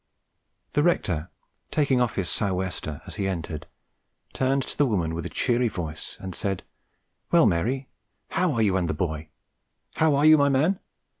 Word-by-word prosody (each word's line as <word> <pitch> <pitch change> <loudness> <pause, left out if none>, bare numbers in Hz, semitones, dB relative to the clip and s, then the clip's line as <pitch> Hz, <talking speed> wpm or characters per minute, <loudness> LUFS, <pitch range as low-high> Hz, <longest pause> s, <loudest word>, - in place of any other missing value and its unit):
The 145 - +3
rector, 90 - +1 0.4
taking 140 -4 +2
off 120 - +1
his 95 -3 -1
"sou' 100 -3 0
wester" 90 -5 -4
as - - -9
he 100 - 0
entered, 80 -5 -4 0.7
turned 135 +1 +1
to - - -7
the 145 - +3
woman 85 -8 0
with 85 0 -3
a - - -9
cheery 120 -1 +1
voice, 85 -7 -5
and 95 -1 -6
said, 95 0 -2 0.7
"Well, - - +6
Mary, 130 +11 +1 0.4
how 180 -2 +1
are 115 -2 +2
you 95 -3 +3
and 90 -3 0
the 75 - -1
boy? 80 -2 -3 0.6
how 160 -2 +3
are 145 +2 +3
you, 155 -1 +8
my 140 0 +4
man? 155 +8 +2
100 Hz, 175 wpm, -26 LUFS, 85-140 Hz, 0.7 s, you